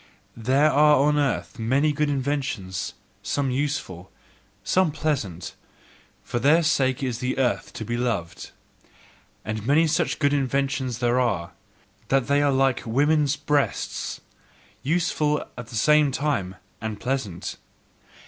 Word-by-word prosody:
There 135 +6 +3
are 150 +1 +5
on 145 +2 +3
the - - +3
earth 135 -2 -2
many 135 +7 +2
good 150 0 0
inventions, 130 -9 -2 0.3
some 130 +7 -1
useful, 125 -10 -3 0.5
some 185 - +2
pleasant: 130 - -3 0.7
for 120 - -3
their 155 +7 +4
sake 135 -5 +1
is 125 -3 -2
the 125 +1 -2
earth 130 -2 0
to 110 - -6
be 120 +2 -2
loved. 95 -9 -3 1.0
And 110 +1 -4
many 155 +4 +4
such 155 - 0
good 145 -1 +2
inventions 135 -3 -1
are 120 0 +3
there, 115 -9 0 0.6
that 135 -2 +2
they 140 0 +2
are 145 -1 +3
like 135 -1 +2
woman's 145 +4 +2
breasts: 145 -1 -1 0.6
useful 150 -1 0
at 125 -2 -8
the 115 - -9
same 150 +5 +4
time, 130 -10 -1 0.3
and 110 -1 -4
pleasant. 125 -10 -3
135 Hz, 135 wpm, -24 LUFS, 115-145 Hz, 1.0 s, are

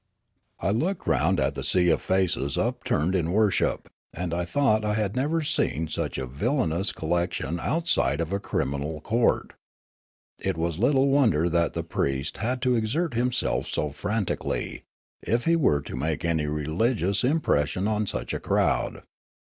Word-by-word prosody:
I 95 - 0
looked 170 - -1
round - - +2
at - - +1
the - - -5
sea 90 -2 +3
of - - +1
faces 90 -7 0
upturned 115 -8 0
in 85 -4 0
wor 105 +1 +3
ship, - - 0 0.2
and 85 0 -4
I 85 0 -1
thought 110 +1 +2
I 105 0 0
had 105 -2 -1
never 155 +5 0
seen 80 - 0
such - - -3
a 65 - -2
villainous 90 - 0
collection 85 -1 -2
outside 140 - +1
of 85 +2 -2
a 100 - 0
criminal 70 -2 -2
court. 115 +7 +1 0.9
It - - -2
was 85 0 -2
little 135 +3 +3
wonder 110 - +3
that 85 -1 +1
the - - -2
priest 70 +1 -2
had 125 +3 -2
to 125 -1 +3
exert 125 +8 0
himself 125 +2 0
so 75 - -1
frantic 105 +7 -2
ally, - - -3 0.4
if 115 +2 0
he 165 - +4
were 95 - +3
to - - -7
make 75 +5 -2
any 80 -3 0
religious 90 - 0
impression 95 - +1
on 105 -1 0
such - - -3
a - - -2
crowd. - - 0
95 Hz, 165 wpm, -26 LUFS, 80-120 Hz, 0.9 s, he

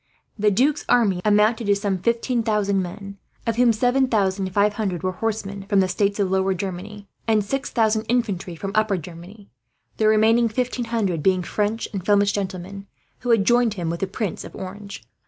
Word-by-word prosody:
The 210 -1 +2
Duc's 270 +9 +1
army 200 -7 +3
amounted 215 +2 +3
to 200 - +4
some 200 -2 -1
fifteen 235 +4 0
thousand 210 -3 +1
men, 195 +2 -8 0.3
of 230 -1 -1
whom 245 -1 +5
seven 245 +4 +2
thousand 195 -4 0
five 205 +2 +2
hundred 195 -5 -3
were 185 - 0
horsemen 200 -1 -4
from 200 -2 +3
the 190 - +3
states 200 +2 0
of 195 -2 +1
Lower 190 0 +1
Germany, 200 +3 -6 0.2
and 215 -2 +2
six 270 +6 -2
thousand 220 -1 +1
infantry 205 -8 -1
from 195 +4 -5
Upper 215 -2 +2
Germany; 180 +5 -11 0.5
the 215 - +2
remaining 225 +2 +4
fifteen 250 +1 -2
hundred 205 -8 -1
being 185 +1 +2
French 210 +4 -2
and 195 -3 -4
Flemish 205 +1 +3
gentlemen, 195 0 -5 0.3
who 245 - -5
had 225 -4 +4
joined 240 -2 +3
him 170 -4 -2
with 170 - -4
the 195 - -1
Prince 195 -1 -4
of - - -11
Orange. 200 - -8
205 Hz, 190 wpm, -22 LUFS, 190-225 Hz, 0.5 s, whom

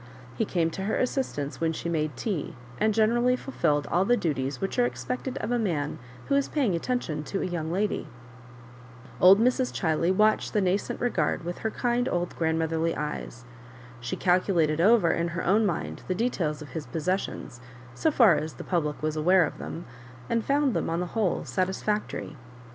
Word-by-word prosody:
He 225 - 0
came 165 -4 0
to 190 +3 -4
her 220 - 0
assistance 245 - -2
when 165 0 +1
she 160 - -5
made 155 -5 -1
tea, 190 - -3 0.2
and 215 - +3
generally 235 +3 +3
fulfilled 150 - 0
all 180 - +3
the 245 +5 +3
du 165 -8 0
ties 135 +1 -3
which 195 +5 -2
are 245 - +5
expected 250 +1 -4
of - - -3
a 245 - +2
man 160 -9 -1 0.3
who - - -1
is 280 0 +2
paying 265 - +1
attention 170 -5 -2
to 195 - -2
a - - -1
young 170 -3 -3
lady. 200 +4 -1 1.1
Old 190 +3 +8
Mrs. 250 +2 +2
Chiley 165 0 +1
watched 215 +3 +2
the 210 - +3
nascent 190 +1 0
regard 180 -10 0
with 175 0 -4
her 220 - -1
kind 245 +2 0
old 175 0 -2
grandmotherly 160 0 0
eyes. 135 -5 -5 0.5
She 120 0 -4
calculated 175 -4 +2
over 205 -3 +5
in 170 0 0
her 170 0 -4
own 210 +4 +4
mind 170 -4 -3
the 185 - 0
details 175 -9 -1
of 145 - -12
his 160 -3 -6
possessions, 165 -7 -3 0.3
so 315 - +1
far 235 - +6
as 155 -1 -4
the - - -8
public 150 -5 -1
was 155 0 0
aware 180 +4 +4
of - - -7
them, 170 - -6 0.4
and 230 -1 0
found 280 -2 +2
them - - -1
ou 165 - 0
the 180 - -1
whole 215 -6 0
satisfactory. 190 -2 -2
180 Hz, 185 wpm, -27 LUFS, 160-220 Hz, 1.1 s, Old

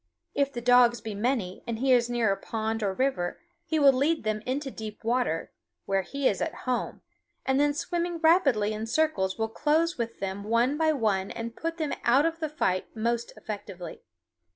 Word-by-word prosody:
If 280 -1 +1
the 240 - -5
dogs 245 0 +5
be 220 - -6
many 205 -3 -1
and 230 -1 -2
he 265 +3 +1
is 240 -1 +3
near 235 -4 +2
a - - +1
pond 220 +2 -3
or 200 -2 +1
river, 190 -5 -1 0.2
he 325 -2 -1
will 280 -2 +6
lead 290 +4 +1
them 215 -1 -1
into 270 +1 -2
deep 215 -2 -8
water, 235 -8 0 0.3
where 195 0 +1
he 275 +8 -1
is 195 - 0
at - - -2
home, 255 -1 -2 0.4
and 265 +1 +2
then 290 0 +3
swimming 345 +2 -2
rapidly 285 - +3
in 215 +1 -4
circles 225 -9 +1
will 220 0 0
close 315 +6 +1
with 230 -1 -3
them 195 +1 -4
one 230 +6 +2
by 315 0 +3
one 210 -9 0
and 230 0 -6
put 330 +1 -3
them 310 -3 -1
out 265 +5 +4
of 330 0 -1
the 315 -2 -2
fight 185 -11 0
most 235 +1 -1
effectively. 200 -4 -7
240 Hz, 195 wpm, -27 LUFS, 215-290 Hz, 0.4 s, will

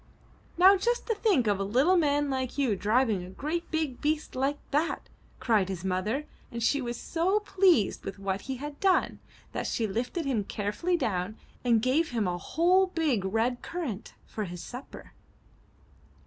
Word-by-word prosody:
'' - - -30
''Now 380 +3 +8
just 480 +2 0
to 455 - +1
think 405 - +2
of 205 -2 +1
a - - 0
little 260 - +3
man 290 -4 +2
like 260 0 -2
you 260 -7 +2
driving 215 -1 +1
a 180 - -9
great 310 - -4
big 315 -6 -2
beast 305 +1 -1
like 275 +3 0
that!" 300 +4 0 0.3
cried 215 -7 +2
his 185 -1 -5
mother, 210 +10 -1 0.3
and 235 -1 -4
she 285 +4 +2
was 240 -1 -4
so 365 +5 +1
pleased 370 - +3
with 195 - -6
what 195 0 -2
he 265 - -1
had 285 +2 -7
done, 385 -2 +2 0.3
that - - -3
she 230 - 0
lifted 245 - -2
him 245 -7 0
carefully 210 - -1
down 210 - -2 0.3
and 230 -3 +3
gave 295 +6 +2
him 225 -6 0
a 175 0 -2
whole 360 - +3
big 315 - 0
red 225 +5 0
currant 285 - -5
for 215 - -4
his 175 -1 -7
supper. 250 +2 -10
255 Hz, 175 wpm, -28 LUFS, 210-325 Hz, 0.3 s, Now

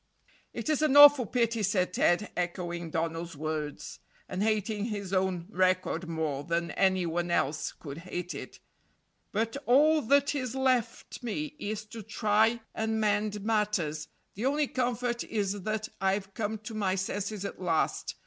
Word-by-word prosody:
"It - - -6
is 305 -1 +1
an 295 -2 +4
awful 290 -5 +9
pity," 230 -1 0
said 185 -2 +1
Ted, 180 +5 +2
echoing 175 -1 -3
Donald's 165 0 -3
words, 155 -1 -4 0.3
and 185 - -4
hating 215 -1 0
his 200 -4 -4
own 185 -2 0
record 185 -2 +1
more 155 -4 -2
than 170 +2 -1
any 190 -2 +2
one 170 +1 -1
else 155 -3 0
could 145 0 -9
hate 180 0 -5
it; - - -8 0.7
"but 225 +5 -1
all 300 +5 +5
that 280 +4 +3
is 255 -3 -3
left 255 -3 0
me 300 +6 -4
is 215 -1 -4
to 225 +1 -9
try 215 +2 +2
and 220 0 -1
mend 210 -1 0
matters. 205 -9 0 0.3
The 225 +7 -1
only 295 +2 +2
comfort 245 -2 -1
is 205 -2 -2
that 215 +2 -2
I've 195 0 0
come 220 0 -2
to 225 - -7
my 200 -3 0
senses 200 +1 -3
at 200 - -6
last. 165 -3 0
205 Hz, 155 wpm, -29 LUFS, 180-230 Hz, 0.7 s, awful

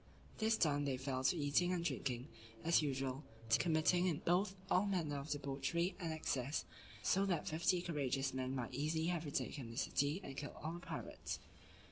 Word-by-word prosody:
This 220 0 +3
done, 145 -5 +2
they 135 -2 0
fell 130 0 -2
to 180 - +4
eating 150 +4 +3
and 175 -2 0
drinking, 130 -4 -1 0.3
and 115 - -9
as 170 - +6
usual, 135 -1 -1 0.3
to 115 - +5
committing 170 0 +3
all 190 +1 +2
manner 160 -7 0
of 140 +2 -7
debauchery 145 +5 -1
and 165 -3 -2
excess, 145 -3 -1 0.4
so 195 - +3
that 175 -5 0
fifty 175 +3 +2
courageous 135 -5 0
men 130 0 -1
might 125 -3 -3
easily 155 +3 0
have 165 -2 -2
retaken 140 -3 -2
the 115 - -8
city, 145 +5 +1
and 135 - -6
killed 145 +1 -5
all 160 +2 -2
the 175 - -5
pirates. - - -5
150 Hz, 175 wpm, -39 LUFS, 135-175 Hz, 0.4 s, as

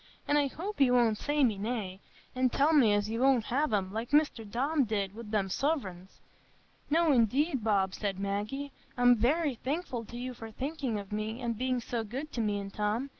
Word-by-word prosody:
An' 290 - +2
I 290 -1 +3
hope 375 +6 -5
you 255 -2 +5
won't 230 -4 +3
say 290 0 +1
me 215 -6 +2
nay, 205 -4 -3 0.3
an' 255 0 +2
tell 285 +6 +2
me 255 -8 +5
as 205 0 +1
you 225 +1 -3
won't 265 -3 +4
have 275 +3 0
'em, 195 -2 0
like 225 +2 -3
Mr 290 -8 +1
Tom 280 +5 +1
did 200 -4 -2
wi' 225 - -8
the 210 -3 0
suvreigns." 190 - -3 0.7
"No, 325 +1 +3
indeed, 260 +2 +2
Bob," 195 -3 +2
said 200 -3 -3
Maggie, 210 +9 -3 0.3
"I'm 245 0 +6
very 285 +6 +1
thankful 260 -1 -3
to 240 - -9
you 250 +1 -4
for 225 -2 -9
thinking 265 -1 -3
of 200 -1 -7
me, 215 +2 -3
and 235 -2 -2
being 255 +2 0
so 235 -1 -3
good 265 +8 -6
to 235 - -2
me 210 -2 0
and 195 0 -7
Tom. 215 +6 -1
240 Hz, 205 wpm, -30 LUFS, 210-275 Hz, 0.7 s, I'm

